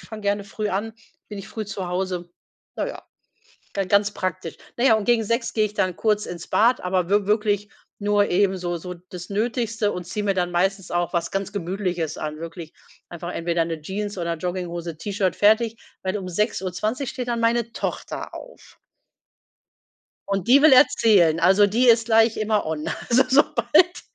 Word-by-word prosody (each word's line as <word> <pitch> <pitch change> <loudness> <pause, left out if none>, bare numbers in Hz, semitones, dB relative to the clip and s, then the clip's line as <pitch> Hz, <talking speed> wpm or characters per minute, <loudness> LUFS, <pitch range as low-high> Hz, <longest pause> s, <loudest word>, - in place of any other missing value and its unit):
fange 220 -1 -10
gerne 200 0 0
früh 210 +1 -4
an, 210 +3 -3 0.3
bin 210 - -7
ich 195 - -9
früh 220 -1 -5
zu 195 -2 -5
Hause.“ 180 -1 -3 0.5
Na - - -1
ja, - - -7 0.7
dann 195 -2 -1
ganz 200 +1 +3
praktisch. 185 -4 -4 0.2
Na 240 - 0
ja, 265 - +6
und 215 -2 0
gegen 235 -2 +3
6:00 230 +2 -1
gehe 215 -1 +3
ich 210 - -11
dann 185 -3 0
kurz 210 -1 +1
ins 170 -1 -7
Bad, 240 +3 +3
aber 180 -1 0
wi 205 -1 +2
wirklich 210 -1 +1 0.3
nur 205 0 +2
eben 190 +1 +2
so 175 -1 -3
so 180 +2 -7 0.2
das 180 -1 -8
Nötigste 225 0 -1
und 180 - -5
ziehe 205 +4 -4
mir 195 - +1
dann 180 -1 -1
meistens 190 +1 0
auch 175 0 0
was 170 -1 -2
ganz 195 +1 -3
Gemütliches 180 -4 -3
an, 155 0 -5
wirklich 165 0 -8 0.4
einfach 175 +1 -7
entweder 170 0 0
'ne 165 -1 -5
Jeans 205 +5 -4
oder 170 -1 -1
Jogginghose, 175 -1 -4
T-Shirt, 195 +1 -1
fertig. 220 +2 +3 0.3
Weil 190 +2 -1
um 190 -3 -5
6:20 210 +6 -2
steht 250 -4 -5
dann 235 -1 -1
meine 230 0 +1
Tochter - - -5
auf. - - -13 1.5
Und 195 -2 -1
die 265 +4 +6
will 310 -2 +7
erzählen, 200 - +5
also 190 +4 +5
die 230 +5 +2
ist 230 -1 +6
gleich 225 0 +4
immer 215 -2 0
on. 155 -1 -3 0.2
Also 250 +2 +5
sobald 295 +6 +3
200 Hz, 180 wpm, -23 LUFS, 180-220 Hz, 1.5 s, will